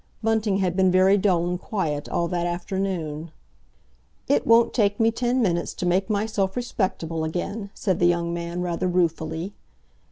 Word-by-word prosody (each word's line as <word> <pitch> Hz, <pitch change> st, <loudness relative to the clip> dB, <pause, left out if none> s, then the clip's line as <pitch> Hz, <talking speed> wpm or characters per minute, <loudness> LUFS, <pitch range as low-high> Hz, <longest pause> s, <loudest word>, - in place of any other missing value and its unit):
Bunting 220 Hz, -3 st, +1 dB
had 185 Hz, -3 st, 0 dB
been 190 Hz, 0 st, +4 dB
very 185 Hz, +2 st, +5 dB
dull 185 Hz, -4 st, +2 dB
and 180 Hz, 0 st, -2 dB
quiet 160 Hz, -, -2 dB
all 170 Hz, -, 0 dB
that 175 Hz, 0 st, -1 dB
afternoon. 175 Hz, -3 st, -3 dB, 1.0 s
"It 285 Hz, -, +2 dB
won't 230 Hz, +1 st, +5 dB
take 205 Hz, -3 st, +1 dB
me 225 Hz, 0 st, +4 dB
ten 245 Hz, +2 st, 0 dB
minutes 170 Hz, -4 st, 0 dB
to -, -, -3 dB
make 185 Hz, +2 st, +1 dB
myself 205 Hz, -2 st, 0 dB
respectable 185 Hz, -9 st, -2 dB
again," 195 Hz, +6 st, -3 dB
said 190 Hz, -4 st, -1 dB
the 175 Hz, -, +4 dB
young 170 Hz, -1 st, +1 dB
man 170 Hz, +1 st, -3 dB
rather 180 Hz, +1 st, -1 dB
ruefully. 165 Hz, 0 st, -1 dB
185 Hz, 160 wpm, -24 LUFS, 170-205 Hz, 1.0 s, very